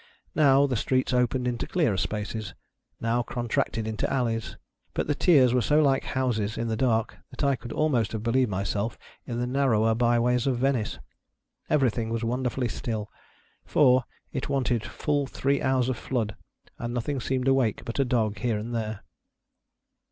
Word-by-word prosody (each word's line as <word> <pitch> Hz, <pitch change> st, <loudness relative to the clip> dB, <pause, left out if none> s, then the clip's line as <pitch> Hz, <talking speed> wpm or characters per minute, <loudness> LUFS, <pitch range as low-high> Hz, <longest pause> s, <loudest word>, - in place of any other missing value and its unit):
Now, 140 Hz, -2 st, +5 dB
the 135 Hz, -3 st, -1 dB
streets 130 Hz, +3 st, 0 dB
opened 125 Hz, 0 st, +1 dB
into 120 Hz, -1 st, -2 dB
clearer 155 Hz, -, +1 dB
spaces, 105 Hz, -1 st, -3 dB, 0.4 s
now 115 Hz, +1 st, +1 dB
contracted 115 Hz, -2 st, -2 dB
into 110 Hz, -1 st, -2 dB
alleys; 115 Hz, -4 st, -1 dB, 0.4 s
but -, -, 0 dB
the 150 Hz, -, +1 dB
tiers 140 Hz, -6 st, +5 dB
were 125 Hz, -, +3 dB
so 150 Hz, +7 st, +3 dB
like 140 Hz, -3 st, +3 dB
houses, 115 Hz, -5 st, -1 dB
in 115 Hz, -, -2 dB
the 110 Hz, -, 0 dB
dark, 115 Hz, -2 st, +1 dB
that -, -, -6 dB
I 140 Hz, -1 st, +3 dB
could 120 Hz, -1 st, -9 dB
almost 130 Hz, -9 st, +1 dB
have 110 Hz, -1 st, -3 dB
believed 125 Hz, +1 st, +2 dB
myself 100 Hz, +3 st, -2 dB, 0.3 s
in 120 Hz, -1 st, -3 dB
the 120 Hz, -, 0 dB
narrower 125 Hz, -4 st, +2 dB
bye 120 Hz, +1 st, +2 dB
ways 125 Hz, +2 st, +2 dB
of 130 Hz, -3 st, +1 dB
Venice. 130 Hz, -3 st, 0 dB, 0.7 s
Everything 120 Hz, -6 st, +1 dB
was 115 Hz, 0 st, -2 dB
wonderfully 125 Hz, +1 st, -1 dB
still; 110 Hz, -2 st, -4 dB, 0.5 s
for, 130 Hz, -4 st, +4 dB, 0.3 s
it 130 Hz, -, -3 dB
wanted 125 Hz, -5 st, 0 dB
full 145 Hz, +2 st, -1 dB
three 140 Hz, +2 st, 0 dB
hours 130 Hz, -2 st, +2 dB
of 130 Hz, -2 st, -1 dB
ilood, 115 Hz, -5 st, 0 dB, 0.5 s
and 120 Hz, +1 st, -4 dB
nothing 130 Hz, +3 st, -2 dB
seemed 130 Hz, +1 st, -1 dB
awake 135 Hz, -5 st, +2 dB
but 115 Hz, -, -4 dB
a -, -, +5 dB
dog 115 Hz, -4 st, 0 dB
here 115 Hz, -3 st, 0 dB
and 115 Hz, +3 st, -5 dB
there. 110 Hz, -3 st, -3 dB
120 Hz, 170 wpm, -27 LUFS, 115-130 Hz, 0.7 s, Now